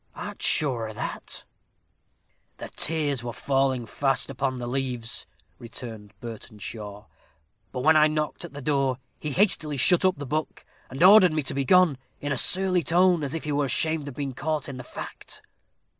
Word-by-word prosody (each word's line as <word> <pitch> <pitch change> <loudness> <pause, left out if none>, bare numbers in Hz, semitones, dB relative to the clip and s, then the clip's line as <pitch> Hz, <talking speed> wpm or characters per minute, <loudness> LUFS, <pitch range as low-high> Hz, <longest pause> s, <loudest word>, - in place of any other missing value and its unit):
"Art - - -7
sure 120 -7 +4
o' - - -8
that?" - - -4 1.1
"The - - -8
tears 145 -5 -1
were 120 - -4
falling 135 -2 0
fast 135 +3 0
upon 135 0 -2
the 125 -1 -5
leaves," 125 -2 -2 0.3
returned 110 -4 -8
Burtenshaw; 105 -2 -8 0.7
"but 125 - -4
when 155 +4 +5
I 155 0 +6
knocked 155 +1 -3
at 175 - -9
the 145 -1 -8
door, 135 -3 +1 0.2
he 150 - -4
hastily 155 -4 +1
shut 175 +8 +4
up 185 -1 +2
the 145 - -6
book, 155 +3 -4 0.2
and 135 +5 -1
ordered 185 -3 +8
me 155 -1 0
to 135 - -1
be 140 0 -1
gone, 180 -5 +4 0.2
in 145 - -4
a - - +1
surly 185 +6 +2
tone, 175 +2 +3
as 140 +1 -3
if 165 - -4
he 150 - -3
were 145 0 +1
ashamed 155 +2 +1
of 140 - -7
being 140 -2 -4
caught 150 +3 -2
in 135 -3 -7
the 130 - -7
fact." - - -8
140 Hz, 180 wpm, -25 LUFS, 125-155 Hz, 1.1 s, ordered